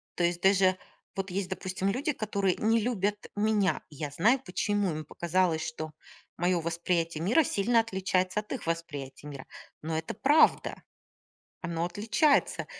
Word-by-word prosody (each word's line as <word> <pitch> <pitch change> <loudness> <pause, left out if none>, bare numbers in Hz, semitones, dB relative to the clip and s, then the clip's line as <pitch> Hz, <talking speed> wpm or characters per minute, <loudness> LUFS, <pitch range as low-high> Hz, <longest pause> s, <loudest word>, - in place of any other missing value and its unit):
То 175 - -1
есть 175 0 +1
даже 190 -1 +4 0.4
вот 195 -1 -3
есть, 190 0 -2
допустим, 185 0 -2
люди, 280 +8 -1
которые 200 -5 0
не 225 +1 +2
любят 205 -3 -1
меня. 210 -2 +1
Я 150 -1 -6
знаю, 225 - +3
почему 205 -1 0
им 155 0 -5
показалось, 170 0 0
что 155 0 -5 0.5
моё 175 0 +1
восприятие 165 -1 -1
мира 245 - +4
сильно 230 -1 +2
отличается 190 -2 0
от 210 - -18
их 250 - -6
восприятия 150 -4 -4
мира. 140 -3 -8 0.4
Но 160 +1 -2
это 160 - -4
правда. 290 +9 +3 0.8
Оно 170 0 -2
отличается. 225 - +1
185 Hz, 145 wpm, -29 LUFS, 165-210 Hz, 0.8 s, даже